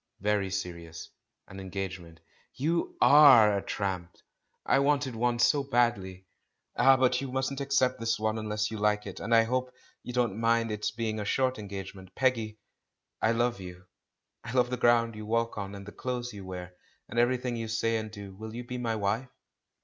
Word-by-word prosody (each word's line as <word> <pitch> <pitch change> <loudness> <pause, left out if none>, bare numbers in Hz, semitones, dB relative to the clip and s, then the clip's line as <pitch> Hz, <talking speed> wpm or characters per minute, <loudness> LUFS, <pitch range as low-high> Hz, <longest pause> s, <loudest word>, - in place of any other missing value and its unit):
"Very 105 -1 +1
serious 85 -3 -6 0.2
— - - -55
an 95 - -10
engagement." 95 -3 -6 0.3
"You 165 +6 -1
are 125 -6 +8
a 100 - -1
trump," 95 -4 -3
she - - -28
said; - - -27 0.4
"I - - +3
wanted 140 -3 +1
one 120 +1 +1
so 140 +4 +3
badly." 110 -8 0 0.5
"Ah, 135 0 +6
but 125 0 +2
you 135 -2 -5
mustn't 130 +1 -2
accept 135 -2 +1
this 115 0 0
one 110 0 -1
unless 105 0 -2
you 110 - -5
like 105 0 +1
it, 100 - -7
and 115 - -5
I 115 - +6
hope 125 +2 -1 0.3
you - - -7
won't 120 -5 +1
mind 115 0 +1
its 105 0 -2
being 110 -1 -3
a - - -2
short 130 +3 0
engagement. 95 -2 -8
Peggy, 115 -5 0 0.6
I 110 - +3
love 120 -2 0
you. 90 0 -10 0.6
I 115 - -7
love 125 -1 +2
the - - +1
ground 115 -1 +3
you 105 0 -8
walk 115 +1 0
on, 100 0 -5
and 100 0 -9
the 105 - -9
clothes 125 0 -4
you 100 -2 -9
wear, 90 -1 -7 0.3
and 120 - -2
everything 125 0 +1
you 115 -1 -4
say 115 +1 0
and 110 -1 -4
do. 100 -2 -9
Will 110 +3 -9
you 120 - -5
be 125 +1 -6
my 115 -2 -1
wife?" 110 +5 -1
115 Hz, 195 wpm, -29 LUFS, 100-125 Hz, 0.6 s, are